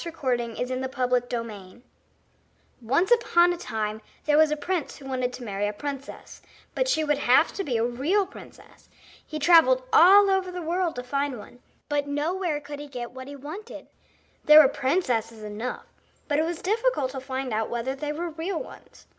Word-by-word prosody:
THE 340 - -5
PRINCESS 245 -4 -2
AND 255 0 -2
THE 260 - -3
PEA 240 -5 -3 1.0
Once 275 - +1
upon 355 -7 +4
a - - -3
time 220 -8 -4 0.2
there 300 - +3
was 310 0 +5
a 300 - -1
prince 350 0 -3
who 280 - -13
wanted 255 -2 -2
to 250 - -8
marry 205 -2 -2
a 210 - -3
princess; 275 +4 -7 0.3
but - - 0
she 315 -11 +1
would 295 -2 0
have 255 +6 +4
to 395 - -3
be 255 -9 -1
a 225 - +1
real 290 +12 +1
princess. 385 - -15 0.3
He 310 - -7
travelled 350 - +5
all 395 +3 +7
over 380 -1 +1
the 360 - -5
world 345 +1 -1
to 250 - -5
find 275 +1 -2
one, 235 +3 -13 0.3
but 290 -1 -1
nowhere 310 +3 -1
could 290 0 -9
he 295 - -8
get 245 -4 -7
what 260 +1 -9
he 285 - -8
wanted. 310 - -9 0.6
There 300 0 +9
were 300 - +8
princesses 245 -7 -1
enough, 215 +4 -5 0.4
but 290 -1 +1
it 315 - +2
was 340 0 -5
difficult 425 - 0
to 265 - -5
find 260 -2 -4
out 220 0 -1
whether 240 +2 -2
they 295 +2 -4
were 335 +3 -4
real 330 +3 -4
ones. - - -12
285 Hz, 190 wpm, -26 LUFS, 245-340 Hz, 1.0 s, There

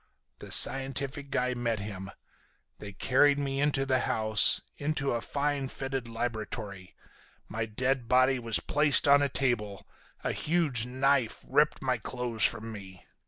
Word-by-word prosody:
The - - -10
scientific 135 +1 +2
guy 125 -1 -1
met 120 -2 -2
him. 100 -2 -7 0.7
They 105 - -8
carried 140 +8 +2
me 135 -1 -2
into 145 -2 +1
the 130 -1 +1
house, 110 -3 +3 0.2
into 145 -1 -2
a 120 - -2
fine 140 +2 -2
fitted 135 -2 -5
laboratory. 110 -4 -5 0.5
My 110 +1 -4
dead 125 +2 -2
body 130 +1 +3
was 115 -2 0
placed 150 0 +3
on 140 0 +6
a 140 - +1
table, 120 -7 -2 0.4
a - - -1
huge 150 -8 -1
knife 130 -2 0
ripped 150 -1 +1
my 130 -2 -1
clothes 120 -1 -2
from 115 0 +3
me. 95 -4 -11
125 Hz, 145 wpm, -28 LUFS, 110-140 Hz, 0.7 s, on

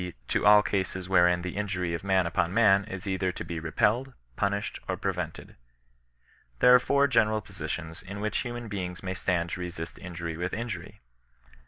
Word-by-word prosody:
to - - +1
all 105 0 +8
cases 95 -2 -2
wherein 90 -1 +4
the 90 -1 -4
in 105 +1 -1
jury 90 -3 -2
of 85 - -3
man 95 -2 +2
upon 85 0 0
man 100 -2 +5
is 95 -3 -7
either 95 -1 0
to - - -6
be 85 -1 -5
repelled, 110 +11 +1 0.2
'punished^ 100 - -1
QxpreverUed, - - -3 1.0
There 125 - +7
are 125 - +9
four 140 +3 +3
general 110 -5 +3
positions 80 -5 -6
in 95 +2 -8
which 105 +1 -1
human 120 -2 -5
beings 90 -3 -5
may 95 0 -2
stand 85 -3 -1
to - - -4
resist 85 -2 -6
injury 85 -2 -5
with 90 +1 -3
injury. 115 0 -6
95 Hz, 175 wpm, -28 LUFS, 90-105 Hz, 1.0 s, are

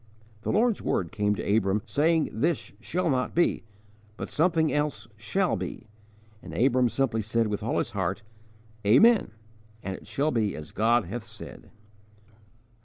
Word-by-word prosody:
'_ - - -30
The - - -2
Lord's 230 0 +2
word 85 -3 -1
came 105 0 +1
to 100 - 0
Abram, 100 -1 +1
saying 155 +8 +2
this 155 +9 -1
'shall 180 +1 -2
not 130 -4 0
be,' 175 -8 +2 0.5
but - - -6
something 160 -1 +2
else 145 -8 -1
'shall 140 - 0
be'; - - -6 0.6
and - - -9
Abram 125 -1 +3
simply 115 -1 0
said 115 +2 0
with 105 -1 -2
all 110 - -1
his 115 - -1
heart, 95 +1 -2 0.6
'Amen' 195 - +5 0.5
'it 95 -1 -6
shall 150 +3 0
be 110 -4 0
as 75 0 -9
God 115 +1 +2
hath 120 -1 -6
said.' 110 -1 -11
120 Hz, 155 wpm, -27 LUFS, 105-155 Hz, 0.6 s, Amen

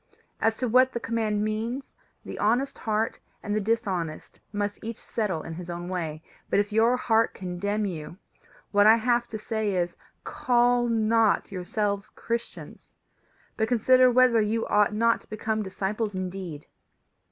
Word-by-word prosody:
As 225 0 +2
to 250 - -2
what 255 +3 +4
the 235 - -2
command 220 -3 -1
means, 225 +5 -3 0.3
the - - -7
honest 245 +6 +1
heart 220 0 -1 0.2
and 210 0 -2
the 215 - +1
dishonest 190 -7 -2
must 205 0 -2
each 225 0 -5
settle 195 -8 -2
in 165 - -7
his 175 +1 -8
own 175 +1 -5
way; 160 -4 -4 0.3
but - - +3
if 205 +1 0
your 225 +3 +3
heart 225 -2 +2
condemn 200 +3 -2
you, 165 -2 -6 0.5
what 205 0 +5
I 220 - +8
have 240 +1 +1
to 220 - -5
say 215 -2 -2
is, 175 -1 -1 0.3
Call 245 0 +2
not 225 -2 +2
yourselves 200 +2 -2
Christians, 235 0 -6 0.7
but 220 - +1
consider 255 +2 +5
whether 250 -2 +5
you 220 +2 0
ought 210 0 +3
not 230 +1 +2
to - - -23
become 215 0 -2
disciples 200 +2 -3
indeed. 185 -5 -5
215 Hz, 155 wpm, -26 LUFS, 195-230 Hz, 0.7 s, I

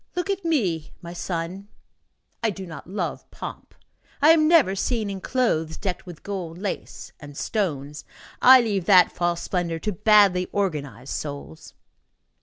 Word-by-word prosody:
Look 360 +2 -1
at 395 -1 -3
me, 195 - -1
my 170 0 -7
son. 175 +2 -4 0.7
I 225 - +2
do 190 -2 -6
not 165 0 -10
love 200 - -4
pomp. - - -9 0.4
I 300 +3 +7
am 310 -1 +5
never 305 - +5
seen 215 0 -1
in 190 -1 -6
clothes 160 -12 0
decked 185 -2 -4
with 175 -3 -10
gold 180 -5 -5
lace 195 +1 -6
and 145 -2 -11
stones; 150 -9 -3 0.4
I 260 0 +9
leave 205 -6 -1
that 185 -2 +6
false 175 -1 -1
splendor 175 -3 -2
to 210 +6 -3
badly 200 -2 +4
organized 145 - -3
souls." 140 - -7
185 Hz, 150 wpm, -24 LUFS, 165-215 Hz, 0.7 s, I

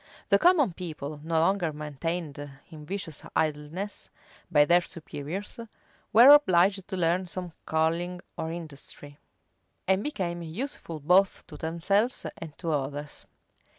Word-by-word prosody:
The - - +5
common 330 - +4
people, 155 -4 -6
no 165 0 +1
longer 175 0 +2
maintained 150 +1 -4 0.3
in 150 -2 -11
vicious 185 -5 -4
idleness 155 +6 -2 0.4
by 150 -4 +5
their 175 +3 +5
superiors, 170 +5 -6 0.5
were 240 +6 +10
obliged 190 -8 +4
to 190 - -4
learn 180 +2 +1
some 180 0 -5 0.2
calling 165 +3 0 0.2
or 160 - -3
industry, 145 -3 -9 0.7
and 190 +1 +3
became 175 -12 -3
useful 170 - -5
both 180 +6 +3
to - - -12
themselves 180 - 0
and 160 -3 -9
to 165 -2 -3
others. 145 0 -4
170 Hz, 125 wpm, -28 LUFS, 155-190 Hz, 0.7 s, were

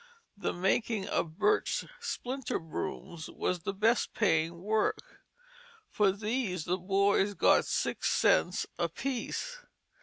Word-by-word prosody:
The 200 - -2
making 195 +3 0
of 160 -1 -1
birch 425 0 +2
splinter 270 - -3
brooms 165 0 -6
was 180 - -2
the 175 - -3
best 225 +4 +2
paying 170 -5 +2
work. 220 - -1 0.7
For 205 -2 +3
these 205 -4 -2
the 180 +2 0
boy 200 +2 +2
got - - +4
six - - 0
cents - - +3
apiece. 275 - -3
200 Hz, 115 wpm, -31 LUFS, 180-235 Hz, 0.7 s, got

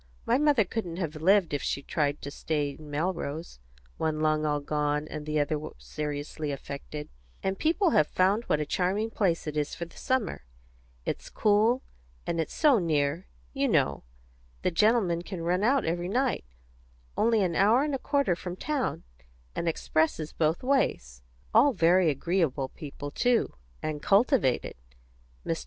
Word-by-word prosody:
My - - +3
mother 290 -8 +4
couldn't 180 -4 -4
have 165 -4 -3
lived, 185 +1 +3
if 145 - 0
she 140 - -2
had - - -28
tried 145 -1 0
to 140 - -5
stay 145 -1 -1
in 150 +1 -12
Melrose. 160 - -3 0.4
One 155 -1 -1
lung 155 0 +2
all 150 0 +1
gone, 150 +1 -1
and 150 -1 -7
the 155 0 0
other 150 +1 0 0.2
seriously 150 0 -4
affected. 140 +2 -6 0.4
And 190 0 -1
people 335 +3 +2
have 150 - +4
found 200 +5 +2
out - - -24
what 150 - +3
a 150 - -1
charming 195 +8 0
place 185 -6 0
it 150 -1 -4
is 150 -1 -1
for 170 - -4
the 170 - -18
summer. 255 - -1 0.6
It's - - -4
cool; 220 +4 +3 0.4
and 165 -1 0
it's 160 - -5
so 290 -7 +5
near, 155 0 0 0.3
you - - +1
know; - - +1 0.6
the 185 - +2
gentlemen 195 -2 +3
can 175 -1 -6
run 180 +3 +1
out 265 +4 +3
every 175 +2 -1
night 255 - 0 0.7
only 225 -2 +3
an 175 -3 0
hour 220 +9 +4
and 295 -1 -1
a 270 - -1
quarter 280 - +1
from 180 0 -6
town, 280 +4 -2 0.5
and 170 - -2
expresses 160 -1 0
both 160 +4 0
ways. 65 - 0 0.3
All 255 +5 +6
very 175 -1 +4
agreeable 150 -2 0
people, 145 -1 -8
too; 245 +8 +1 0.3
and 150 -1 -3
cultivated. 205 - +3 0.7
Mr. - - -1
170 Hz, 165 wpm, -28 LUFS, 150-215 Hz, 0.7 s, All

